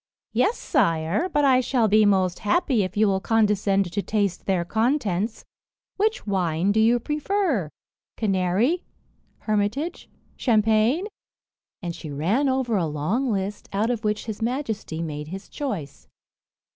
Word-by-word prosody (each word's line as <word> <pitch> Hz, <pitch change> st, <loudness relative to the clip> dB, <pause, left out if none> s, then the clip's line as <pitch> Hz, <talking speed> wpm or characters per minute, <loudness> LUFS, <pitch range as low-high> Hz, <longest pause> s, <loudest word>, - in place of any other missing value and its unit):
"Yes, 470 Hz, -, +2 dB
sire, 165 Hz, -, +1 dB
but 295 Hz, -4 st, +2 dB
I 260 Hz, -2 st, +5 dB
shall 245 Hz, -3 st, +1 dB
be 215 Hz, 0 st, +5 dB
most 185 Hz, -3 st, +2 dB
happy 240 Hz, -, +1 dB
if 185 Hz, 0 st, -3 dB
you 215 Hz, 0 st, +4 dB
will 190 Hz, -1 st, +1 dB
condescend 200 Hz, -3 st, +1 dB
to 205 Hz, -, 0 dB
taste 200 Hz, -3 st, -1 dB
their 185 Hz, -3 st, +1 dB
contents. 220 Hz, -, 0 dB, 0.5 s
Which 430 Hz, +2 st, 0 dB
wine 185 Hz, -2 st, +1 dB
do 215 Hz, -, +2 dB
you 230 Hz, +2 st, +4 dB
prefer 300 Hz, -, -1 dB, 0.5 s
canary, 205 Hz, -, +1 dB, 0.6 s
hermitage, 215 Hz, +10 st, -2 dB, 0.3 s
champagne?" 225 Hz, -, +2 dB, 0.8 s
and 170 Hz, -1 st, -3 dB
she 155 Hz, -, -8 dB
ran 190 Hz, -, +1 dB
over 260 Hz, -4 st, 0 dB
a 170 Hz, -4 st, 0 dB
long 180 Hz, -, -1 dB
list, 200 Hz, 0 st, -3 dB
out 215 Hz, +4 st, +1 dB
of 235 Hz, -2 st, -3 dB
which 210 Hz, 0 st, -1 dB
his 220 Hz, -2 st, -6 dB
majesty 225 Hz, -, -3 dB
made 150 Hz, -2 st, -5 dB
his 190 Hz, +4 st, -7 dB
choice. 200 Hz, -, -5 dB
210 Hz, 140 wpm, -24 LUFS, 185-245 Hz, 0.8 s, I